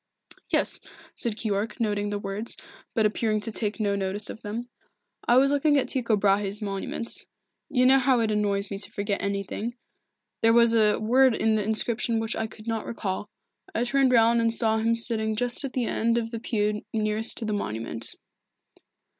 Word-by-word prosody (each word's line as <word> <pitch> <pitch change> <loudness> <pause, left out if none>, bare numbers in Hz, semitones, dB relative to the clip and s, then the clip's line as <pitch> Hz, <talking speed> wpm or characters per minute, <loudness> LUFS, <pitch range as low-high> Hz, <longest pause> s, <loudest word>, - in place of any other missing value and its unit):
"Yes," - - +1 0.3
said 235 -4 -3
Keyork, 215 +1 -2
noting 205 -2 0
the 205 - -2
words, 205 +3 -4 0.4
but 220 -3 +3
appearing 215 0 +1
to 225 - -3
take 215 0 -2
no 205 -2 +1
notice 200 +1 -2
of - - -11
them. 225 +3 -5 0.6
"I 240 - +5
was 275 +2 +5
looking 290 +1 +3
at 270 - +1
Tycho 235 -4 +1
Brahe's 200 0 +2
monument. 200 +2 -3 0.5
You 255 -2 +3
know 265 +1 +6
how 260 -1 +3
it 220 -1 +1
annoys 200 -1 0
me 200 - -4
to - - -9
forget 200 -1 -2
anything 200 +4 -3 0.7
there 225 0 +5
was 235 0 +6
a 215 -2 +4
word 250 +3 +4
in 220 0 +2
the 215 -1 +1
inscription 225 +2 +1
which 225 0 -2
I 220 - -2
could 215 0 -14
not 225 -1 -2
recall. 205 -2 -3 0.5
I 230 - +2
turned 270 +1 +3
round 230 -1 +5
and 230 0 +2
saw 220 -1 +1
him 230 +1 +2
sitting 220 -2 -1
just 245 +4 -1
at 275 - -4
the 250 -2 0
end 230 +1 +1
of 225 -1 -2
the 230 - -4
pew 210 -2 -1
nearest 215 0 -1
to 225 - +1
the 215 - -1
monument." 115 - -2
220 Hz, 190 wpm, -26 LUFS, 205-235 Hz, 0.7 s, know